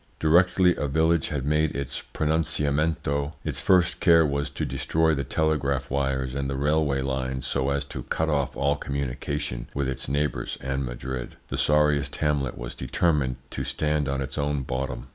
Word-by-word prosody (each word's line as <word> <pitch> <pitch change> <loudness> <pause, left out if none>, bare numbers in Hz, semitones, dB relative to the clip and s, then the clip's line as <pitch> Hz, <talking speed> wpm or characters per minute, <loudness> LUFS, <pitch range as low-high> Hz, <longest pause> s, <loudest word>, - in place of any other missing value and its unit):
Directly 90 +3 +4
a 75 - -1
village 80 +3 +2
had 70 -4 -3
made 75 +1 +1
its 70 -2 -3
pronunciamento 75 -1 0
its - - -3
first 90 -2 +3
care 80 -2 +6
was 70 0 -1
to - - -3
destroy 80 0 +1
the 70 -2 -1
telegraph 75 -2 0
wires 65 -2 0
and 70 0 -2
the 70 - -2
railway 70 -1 +1
lines 65 -1 -2
so 65 +1 0
as 70 0 0
to - - -6
cut 80 - -1
off 70 -3 0
all 70 +1 +2
communication 70 -2 -3
with 70 -1 0
its 65 -1 -3
neighbours 70 -4 -1
and 65 +1 -2
Madrid. 60 0 -5
The - - -3
sorriest 75 -2 +3
hamlet 75 -4 0
was - - -6
determined 65 0 +1 0.2
to - - -3
stand 75 -2 0
on 70 0 -1
its 70 +1 -4
own 70 -1 0
bottom. 65 -1 -4
70 Hz, 170 wpm, -26 LUFS, 65-75 Hz, 0.2 s, care